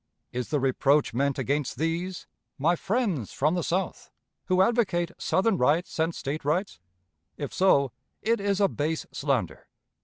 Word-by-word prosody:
Is 125 0 -3
the 150 - +1
reproach 135 +2 +2
meant 140 +3 +1
against 140 +1 -1
these, 170 +4 -2 0.3
my 165 +6 +3
friends 195 - -1
from 150 +4 +1
the 180 - 0
South, 180 +4 -2 0.4
who 185 0 +4
advocate 190 -7 +1
Southern 195 0 +1
rights 155 +7 +1
and 160 +1 +1
State 145 +3 -4
rights? 155 - -1 0.6
If 145 -3 -5
so, 140 -9 +4 0.3
it 230 +3 +2
is 200 0 0
a 200 - +5
base 155 -1 -2
slander. 135 - -2
160 Hz, 150 wpm, -27 LUFS, 140-190 Hz, 0.6 s, a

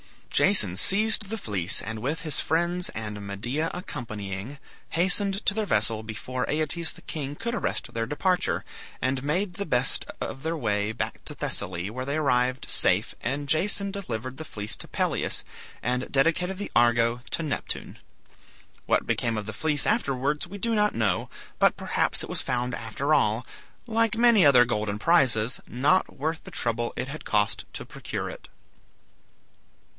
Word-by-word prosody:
Jason 110 - +4
seized 215 - +5
the 225 - -3
fleece 100 - +1
and 110 +1 -4
with 145 +8 -2
his 155 -2 -1
friends 175 +3 0
and 105 -2 -5
Medea 120 +11 -2
accompanying, 110 - -6 0.3
hastened 195 +4 +1
to - - +4
their 215 0 -1
vessel 110 - +2
before 115 +4 -4
Aeetes 160 +2 +1
the - - -15
king 145 -2 -4
could 235 +9 -3
arrest 235 - -2
their 115 0 -1
departure, 180 +7 0 0.3
and 130 0 0
made 175 +6 0
the 200 +1 -3
best 125 -2 +2
of 135 - -5
their 165 +2 -2
way 105 -5 0
back 110 - -4
to - - -5
Thessaly, 85 +4 -2
where 130 +3 -4
they 140 +2 -1
arrived 130 -3 +1
safe, - - +2
and 140 +4 -2
Jason 200 +6 +3
delivered 130 - -5
the 160 - -6
fleece 105 -5 -5
to - - -5
Pelias, - - -1 0.4
and 125 +1 -1
dedicated 170 +7 +2
the 205 - -5
"Argo" 120 0 +3
to 165 - -1
Neptune. 150 -4 -3 0.9
What - - +2
became 115 -2 0
of 105 - -3
the 110 - -5
fleece 150 +5 +1
afterwards 150 - 0
we 200 +3 -8
do 230 +3 -1
not 210 -1 +2
know, 110 -6 0 0.3
but - - +4
perhaps - - 0
it - - -7
was - - 0
found 125 -1 -1
after 130 +7 -1
all, 110 -1 +2 0.4
like 225 -2 +1
many 235 -4 +6
other 130 -4 +7
golden 105 -3 -1
prizes, 125 -5 +3
not 145 +9 +2
worth 160 +3 -2
the - - -7
trouble 120 0 -1
it 125 +2 -3
had 155 +3 -7
cost 105 -1 +1
to - - -4
procure - - -5
it. - - -11
135 Hz, 165 wpm, -26 LUFS, 115-175 Hz, 0.9 s, other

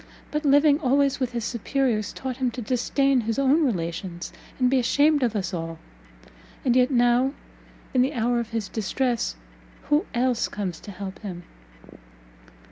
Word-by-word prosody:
But 300 +1 -1
living 285 +1 +5
always 275 -1 +2
with 255 -2 -2
his 235 -2 -2
superiors, 235 -3 -1
taught 260 -2 -5
him 260 -2 +1
to - - -3
disdain 260 +3 +1
his 225 0 -2
own 275 +4 +3
relations, 175 - -3 0.2
and 255 - +3
be 260 +1 +3
ashamed 290 +4 +3
of 235 -3 +1
us 195 -1 -2
all; 165 -1 -4 0.9
and 250 -2 +3
yet 250 0 +4
now, 245 +1 +3 0.6
in 255 - +4
the 265 +4 +1
hour 240 +1 +1
of 235 -1 -4
his 225 -2 -3
distress 230 - -1 0.5
who 295 +2 +2
else 245 -1 +1
comes 185 -5 -4
to 205 - -10
help 195 0 -7
him?" 180 -5 -7
245 Hz, 160 wpm, -25 LUFS, 210-270 Hz, 0.9 s, living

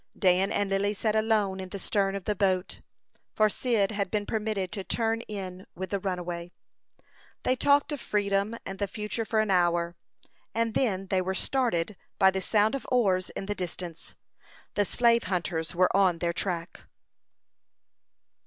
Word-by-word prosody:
Dan 190 0 +3
and 200 -1 0
Lily 200 +2 +1
sat 215 +1 0
alone 215 -3 +2
in 185 -1 -6
the 200 - -5
stern 195 0 0
of 195 - -5
the 210 - 0
boat, 185 -2 0 0.5
for 215 0 +4
Cyd 220 -3 +1
had 200 -2 -1
been 205 0 -1
permitted 210 -4 -2
to 200 -3 -4
turn 225 +2 0
in 190 -3 -6
with 190 +1 -5
the 200 - 0
runaway. 175 -2 -4 0.9
They 255 - +2
talked 285 +3 +3
of 290 -4 -3
freedom 200 +1 0
and 195 0 -6
the 200 - 0
future 210 +3 -3
for 220 0 +2
an 215 -2 0
hour, 175 -1 +2 0.6
and 230 -1 +1
then 195 -7 +1
they 190 -1 +2
were 190 +1 -2
started 215 -7 0 0.2
by 190 0 +6
the 190 0 -2
sound 210 +2 +3
of 275 - -4
oars 190 -7 +2
in - - -4
the 205 - -1
distance. 175 -3 -6 0.6
The 205 - +2
slave 235 +2 +3
hunters 170 -4 -2
were 185 +1 +3
on 190 -3 +4
their 170 0 -1
track. 170 -2 -3
195 Hz, 170 wpm, -28 LUFS, 185-215 Hz, 0.9 s, by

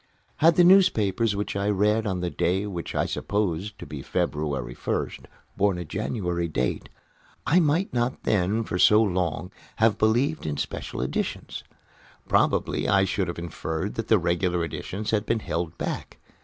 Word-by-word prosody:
Had 165 +1 +5
the 175 - +6
newspapers 115 - +4
which 100 0 -3
I 100 +1 0
read 105 +2 +2
on 95 -2 -2
the 90 -1 -2
day 95 +4 0
which 90 -5 -5
I - - +1
supposed 100 0 -2
to - - -9
be 75 -1 -7
February 70 -3 -2
1st - - -3 0.3
borne 100 -2 +2
a 90 - -5
January 90 0 -2
date, 65 -6 -2 0.6
I 175 - +4
might 165 +2 +1
not 120 +1 -1
then, 105 +3 +1
for 90 -4 -3
so 105 +3 +6
long 90 -4 -1
a - - -11
time, 100 - -30 0.2
have 110 -1 +3
believed 120 - +1
in 75 -1 -2
special - - -4
editions. - - -3 0.6
Probably - - +1
I 95 0 +4
should 95 0 -1
have 85 - -5
inferred 85 +2 -4
that 115 - -4
the 110 - +5
regular 85 0 0
editions 95 +6 -4
had 110 -1 0
been 115 - +1
held 85 -4 -3
back. - - -4
100 Hz, 170 wpm, -25 LUFS, 85-110 Hz, 0.6 s, the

